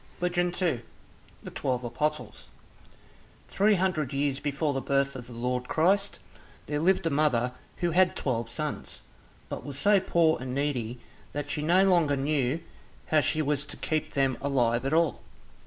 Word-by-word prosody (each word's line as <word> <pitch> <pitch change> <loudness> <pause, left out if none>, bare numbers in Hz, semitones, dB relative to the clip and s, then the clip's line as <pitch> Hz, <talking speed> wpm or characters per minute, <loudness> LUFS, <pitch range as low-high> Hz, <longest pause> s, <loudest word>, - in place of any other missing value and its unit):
Legend 175 0 +1
2 165 -11 0 0.6
The - - -8
Twelve 125 -1 -2
Apostles 125 -2 -3 1.0
Three 205 +2 +3
hundred 175 -7 0
years 140 0 0
before 145 +1 -1
the 135 - -2
birth 140 0 +1
of 125 -2 -8
the 120 - -10
Lord 125 +1 -2
Christ, 195 +5 +2 0.5
there 150 0 -2
lived 180 +2 +2
a 165 - +1
mother 135 -5 +2 0.3
who 170 - +2
had 185 +2 +3
twelve 115 -4 -1
sons, 150 +4 -5 0.5
but - - -6
was 140 -2 -6
so 200 +7 +4
poor 165 -6 +2
and 130 0 -4
needy 125 -5 -1 0.4
that 145 0 -4
she 155 - -2
no 180 +5 +4
longer 170 -6 +3
knew 140 +1 0 0.5
how 155 - +5
she 155 +1 +1
was 145 -1 0
to - - -7
keep 155 -1 -2
them 135 -2 +1
alive 125 -3 +1
at 135 - -1
all. 165 0 +2
145 Hz, 165 wpm, -28 LUFS, 130-165 Hz, 1.0 s, how